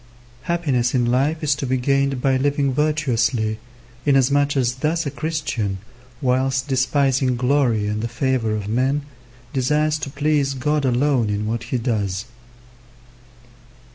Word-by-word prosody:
Happiness 135 Hz, -8 st, +1 dB
in 125 Hz, -1 st, +2 dB
life 140 Hz, +7 st, +1 dB
is 150 Hz, -1 st, +3 dB
to 140 Hz, -1 st, -4 dB
be 130 Hz, +1 st, +1 dB
gained 135 Hz, 0 st, 0 dB
by 135 Hz, -1 st, +3 dB
living 140 Hz, 0 st, +1 dB
virtuously, 125 Hz, -7 st, 0 dB, 0.4 s
inasmuch 140 Hz, +1 st, +3 dB
as 125 Hz, -2 st, +1 dB
thus 160 Hz, +4 st, 0 dB
a 140 Hz, -, -2 dB
Christian, 145 Hz, -12 st, -2 dB, 0.5 s
whilst 130 Hz, +1 st, +1 dB
despising 130 Hz, -1 st, +1 dB
glory 125 Hz, -4 st, +1 dB
and 105 Hz, +1 st, -2 dB
the 115 Hz, -, -2 dB
favour 120 Hz, -2 st, 0 dB
of 105 Hz, -2 st, -4 dB
men, 130 Hz, +6 st, 0 dB, 0.5 s
desires 150 Hz, +3 st, +1 dB
to 145 Hz, -, -4 dB
please 145 Hz, -1 st, 0 dB
God 150 Hz, +2 st, 0 dB
alone 125 Hz, -2 st, +2 dB
in 105 Hz, +1 st, -1 dB
what 115 Hz, +1 st, -3 dB
he 130 Hz, -, -2 dB
does. 105 Hz, -4 st, -2 dB
130 Hz, 140 wpm, -21 LUFS, 120-145 Hz, 0.5 s, is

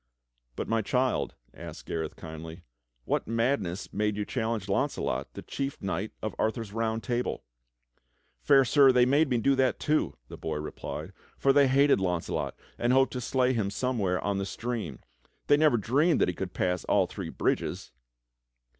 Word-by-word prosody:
"But, -, -, -4 dB
my 115 Hz, 0 st, +1 dB
child" 125 Hz, +4 st, 0 dB, 0.2 s
asked -, -, -9 dB
Gareth 80 Hz, -1 st, -3 dB
kindly, 80 Hz, +2 st, -9 dB, 0.4 s
"what -, -, -1 dB
madness 115 Hz, -6 st, -1 dB
made 105 Hz, 0 st, 0 dB
you 105 Hz, -, -1 dB
challenge 110 Hz, -5 st, -2 dB
Launcelot, 70 Hz, -8 st, -1 dB
the -, -, -7 dB
chief 135 Hz, 0 st, -4 dB
knight 95 Hz, +2 st, -3 dB
of 110 Hz, -, -2 dB
Arthur's 110 Hz, -2 st, -1 dB
Round 115 Hz, 0 st, -1 dB
Table?" 125 Hz, -1 st, -2 dB, 1.0 s
"Fair 135 Hz, -2 st, +5 dB
Sir, 135 Hz, +1 st, +6 dB
they 125 Hz, -1 st, +5 dB
made 145 Hz, +3 st, +3 dB
me 125 Hz, -, +2 dB
do 135 Hz, +4 st, +3 dB
that 130 Hz, -1 st, +2 dB
too," 155 Hz, +1 st, 0 dB
the -, -, -9 dB
boy -, -, -3 dB
replied, 75 Hz, 0 st, -6 dB, 0.2 s
"for 135 Hz, -, +3 dB
they 140 Hz, -1 st, +6 dB
hated 140 Hz, 0 st, +4 dB
Launcelot, 90 Hz, -3 st, -2 dB, 0.2 s
and 120 Hz, -, +2 dB
hoped 135 Hz, 0 st, +4 dB
to 125 Hz, -, -3 dB
slay 130 Hz, +1 st, +1 dB
him 110 Hz, -5 st, 0 dB
somewhere 100 Hz, -5 st, 0 dB
on 100 Hz, -1 st, 0 dB
the 100 Hz, -, -1 dB
stream. 110 Hz, -, -4 dB, 0.4 s
They 145 Hz, -, +5 dB
never 150 Hz, -5 st, +4 dB
dreamed 145 Hz, -, +2 dB
that -, -, +3 dB
he -, -, -1 dB
could 90 Hz, +1 st, -5 dB
pass 90 Hz, -1 st, 0 dB
all -, -, +3 dB
three -, -, -6 dB
bridges." -, -, -1 dB
115 Hz, 170 wpm, -28 LUFS, 95-130 Hz, 1.0 s, Sir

